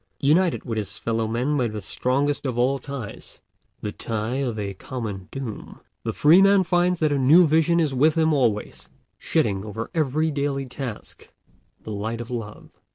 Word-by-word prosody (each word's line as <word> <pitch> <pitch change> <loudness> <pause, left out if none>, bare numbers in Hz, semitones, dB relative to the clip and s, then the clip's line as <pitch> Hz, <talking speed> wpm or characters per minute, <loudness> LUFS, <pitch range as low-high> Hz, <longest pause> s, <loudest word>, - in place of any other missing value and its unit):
United 165 +5 +2
with 115 -3 -2
his 100 -1 -6
fellow 115 -1 -1
men 125 +6 0
by 125 -4 +1
the 110 -1 -5
strongest 135 +8 -1
of 125 -2 -3
all 130 +3 +2
ties, 130 -6 -8 0.4
the 105 - -3
tie 110 +3 -3
of 125 -5 -2
a 100 -2 -3
common 100 -3 -6
doom, 130 -6 -7 0.2
the - - -2
free 165 +6 +6
man 195 0 +5
finds 175 0 +1
that 155 -2 +2
a 140 - +1
new 155 +7 +6
vision 160 +2 +3
is 155 -5 +1
with 150 +4 +3
him 160 -1 +3
always, 115 -7 -1 0.3
shedding 95 -1 0
over 110 +2 -6
every 155 0 +1
daily 140 -1 -1
task 125 -3 -8 0.5
the 110 - -7
light 110 +3 -3
of 120 +1 -7
love. 115 -4 -6
130 Hz, 175 wpm, -24 LUFS, 110-150 Hz, 0.5 s, free